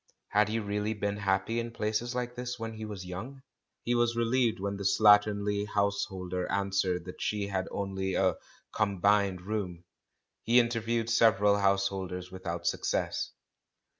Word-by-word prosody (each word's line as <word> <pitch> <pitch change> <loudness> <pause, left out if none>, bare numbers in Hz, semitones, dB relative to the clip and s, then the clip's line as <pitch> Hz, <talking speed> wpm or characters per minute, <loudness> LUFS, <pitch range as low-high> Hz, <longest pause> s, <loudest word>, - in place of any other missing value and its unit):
Had 105 0 +3
he 110 - 0
really 105 0 -2
been 100 0 -2
happy 100 +3 0
in 115 0 -3
places 115 +2 -2
like 125 -1 -2
this 125 0 -5
when 115 -1 -5
he 110 0 -6
was 100 -4 -7
young? 115 +10 -7 0.4
He 120 - 0
was 120 -1 +2
relieved 115 -1 +2
when 100 +1 -3
the 100 - -5
slatternly 105 0 +4
householder 95 -3 -1
answered 95 -3 0
that 90 - -9
she 105 -1 -1
had 95 -1 -2
only 95 -1 -2
a 95 -3 +2 0.4
"combined 100 -2 +2
room." 90 -3 -4 0.6
He 120 +2 +5
interviewed 115 -1 0
several 105 -3 +4
householders 95 -2 0
without 85 -2 -5
suc - - -1
cess. - - -1
100 Hz, 150 wpm, -30 LUFS, 95-115 Hz, 0.6 s, He